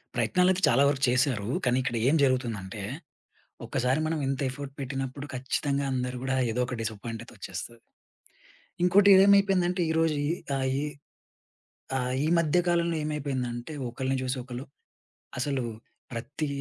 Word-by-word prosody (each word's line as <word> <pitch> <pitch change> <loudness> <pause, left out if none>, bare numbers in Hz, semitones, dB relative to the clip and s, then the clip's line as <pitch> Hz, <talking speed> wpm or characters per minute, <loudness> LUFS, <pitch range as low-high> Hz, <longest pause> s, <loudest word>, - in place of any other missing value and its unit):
ప్రయత్నాలయితే 185 0 +2
చాలా 135 +4 +4
వరకు 135 -1 -2
చేశారు. 125 -4 +1 0.2
కానీ 125 0 +3
ఇక్కడ 120 - -2
ఏం 155 - +3
జరుగుతుందంటే, 115 -7 -1 0.8
ఒక్కసారి 130 +4 0
మనం 160 0 -1
ఇంత 135 +1 -1
ఎఫర్ట్ 140 0 -7
పెట్టినప్పుడు 135 +1 -4
ఖచ్చితంగా 140 +2 -1
అందరూ 125 0 -2
గూడా 130 0 0 0.2
ఏదో 125 +2 +1
ఒక 125 - -4
డిసప్పాయింట్ 115 +1 -5
అయితే - - -15
ఒచ్చేస్తది. 120 0 -7 1.1
ఇంకోటి 195 +3 +6
ఇదేమైపోయిందంటే, 195 -2 +5
ఈరోజు 160 -1 +2
ఈ - - 0 0.3
ఆ! - - 0 0.2
ఈ - - -1 1.1
ఆ! - - 0 0.3
ఈ - - +1
మధ్య 165 0 +2
కాలంలో 170 -1 +2
ఏమైపోయిందంటే, 135 -3 -3 0.2
ఒకళ్ళని 130 +2 -2
చూసి 130 +1 -1
ఒకళ్ళు 125 +1 -7 0.7
అసలు 135 0 -1 0.5
ప్రతి 135 +6 -4
135 Hz, 135 wpm, -28 LUFS, 125-155 Hz, 1.1 s, ఇంకోటి